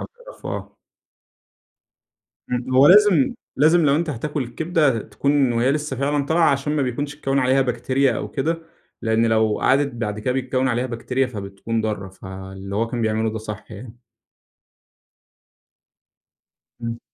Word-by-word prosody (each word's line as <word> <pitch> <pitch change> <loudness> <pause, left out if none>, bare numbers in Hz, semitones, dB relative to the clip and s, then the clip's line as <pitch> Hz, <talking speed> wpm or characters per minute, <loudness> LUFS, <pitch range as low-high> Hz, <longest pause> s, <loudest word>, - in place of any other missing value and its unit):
تقرفوا - - -9
آه. - - -7 1.7
امم، 125 +1 -2
هو 135 +2 +7
لازم 190 -6 +6 0.2
لازم 160 +4 +4
لو 140 -1 +4
أنت 165 +1 -1
هتاكل 150 +2 -3
الكبدة 150 0 +1
تكون 135 +5 +1
وهي 120 +3 +2
لسه 150 -1 -2
فعلًا 140 +2 0
طالعة، 160 +2 +3
عشان 140 +2 -1
ما 150 - +1
بيكونش 140 +3 -3
اتكوّن 135 -2 0
عليها 130 +1 +3
بكتيريا 130 +2 +1
أو - - -4
كده. 165 +4 -1 0.4
لإن 110 0 +2
لو 110 -1 +2
قعدِت 140 +2 +3
بعد 105 -3 -3
كده 115 +4 -1
بيتكوّن 130 0 0
عليها 125 0 0
بكتيريا 125 +2 -1
فبتكون 105 0 -4
ضارة، 105 -3 -3
فاللي 95 +1 -8
هو 115 +2 +1
كان 120 0 -3
بيعمله 110 0 0
ده 110 - -4
صح 110 0 -8
يعني. 115 +3 -10 2.8
امم. 115 0 -4
125 Hz, 145 wpm, -22 LUFS, 110-145 Hz, 2.8 s, هو